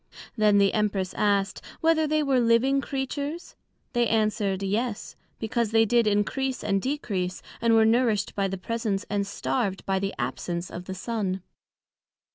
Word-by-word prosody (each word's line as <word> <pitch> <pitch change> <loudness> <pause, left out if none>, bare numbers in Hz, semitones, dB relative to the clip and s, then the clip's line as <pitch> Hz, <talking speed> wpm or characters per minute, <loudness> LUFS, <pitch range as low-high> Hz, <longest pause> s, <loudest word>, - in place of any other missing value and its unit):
Then 210 -2 +4
the 200 -1 +4
Empress 200 -3 0
asked, 200 -2 +1 0.2
Whether 320 -1 +3
they 305 0 +2
were 270 -3 +2
living 240 +4 +3
Creatures? 285 +5 -4 0.4
They 240 -1 +2
answered, 215 -3 0
Yes: 210 +3 -2 0.2
Because 225 0 -1
they 225 +1 +4
did 235 +1 +3
encrease 250 +6 0
and 195 -1 +1
decrease, 200 -10 -2 0.2
and 230 0 +4
were 220 0 +6
nourished 225 -3 +2
by 195 -1 0
the 195 0 -4
presence, 215 0 -2
and 200 -1 0
starved 200 -1 -2
by 190 0 +1
the 195 +1 -3
absence 170 +8 -3
of 180 +1 -7
the 190 - -5
Sun. 195 -3 -3
215 Hz, 155 wpm, -26 LUFS, 195-240 Hz, 0.4 s, were